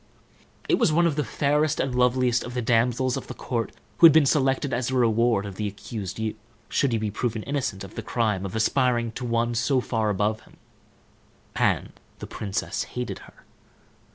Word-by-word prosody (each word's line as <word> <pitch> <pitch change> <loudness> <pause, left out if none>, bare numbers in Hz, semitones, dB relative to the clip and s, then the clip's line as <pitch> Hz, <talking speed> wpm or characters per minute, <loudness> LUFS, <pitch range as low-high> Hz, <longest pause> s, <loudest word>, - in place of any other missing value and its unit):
It - - +2
was - - +3
one 170 +3 +3
of 165 -4 +1
the 150 - 0
fairest 150 +1 +1
and 135 - -1
loveliest 125 0 +2
of 125 +1 -7
the 125 - 0
damsels 120 +2 +1
of - - -7
the - - -7
court 115 -4 -3 0.3
who 165 - +11
had - - +7
been 155 -2 +5
selected 135 -1 +1
as 120 0 -1
the 130 - -1
reward 115 -3 +2
of 100 -2 -8
the 105 - -2
accused 100 -1 -6
youth, 110 -1 -3 0.3
should 140 - +1
he 115 - +1
be 110 -1 -2
proved 115 +2 -2
innocent 135 -9 -2
of 95 - -10
the - - -5
crime 105 -5 -1
of 95 +2 -5
aspiring 120 0 +1
to 125 - -7
one 115 0 0
so 130 +3 +1
far 110 -3 -1
above 105 +2 0
him; - - -21 1.0
and - - +1 0.3
the - - -7
princess 100 -2 -3 0.2
hated 125 - -3
her. - - -23
120 Hz, 195 wpm, -25 LUFS, 110-130 Hz, 1.0 s, who